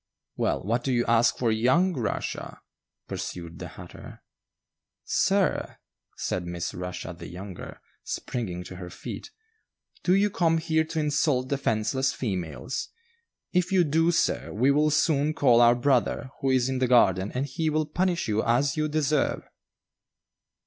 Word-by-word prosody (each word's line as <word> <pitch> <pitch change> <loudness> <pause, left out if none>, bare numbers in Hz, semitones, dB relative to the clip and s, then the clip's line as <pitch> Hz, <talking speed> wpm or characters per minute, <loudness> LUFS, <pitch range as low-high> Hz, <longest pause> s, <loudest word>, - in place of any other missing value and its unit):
"Well, - - 0
what 115 +5 0
do 135 - -1
you 120 -1 +1
ask 115 0 +3
for 120 -3 +1
young 130 +12 +3
Russia?" 120 -8 -4 0.5
pursued 85 -2 -6
the - - -6
hatter. - - -12 0.8
"Sir," - - +1 0.4
said 90 -1 -2
Miss 85 0 -4
Rushia 90 0 -5
the 85 0 -10
younger, 90 0 -9 0.2
springing 100 -9 -4
to 90 +1 -9
her 90 -1 -7
feet, - - -8 0.7
"do 185 - +3
you 205 +1 +3
come 165 -6 +2
here 160 -1 +1
to 160 0 -3
insult 145 -3 +1
defenceless 130 -1 0
females? 95 - -4 0.6
If 180 0 +1
you 185 -2 +4
do, 165 +2 +2
sir, 170 - 0
we 125 +7 +3
will 150 +2 +3
soon 150 0 +2
call 120 -6 +5
our 120 0 +6
brother, 130 0 +1
who 135 - +1
is 130 -1 +3
in 130 -1 -1
the 130 - +2
garden, 95 -5 +4
and 130 +2 0
he 155 +3 -2
will 155 0 +1
punish 175 +3 0
you 110 0 +1
as 130 +4 +2
you 155 -1 0
deserve." 150 -1 0
130 Hz, 150 wpm, -26 LUFS, 110-155 Hz, 0.8 s, our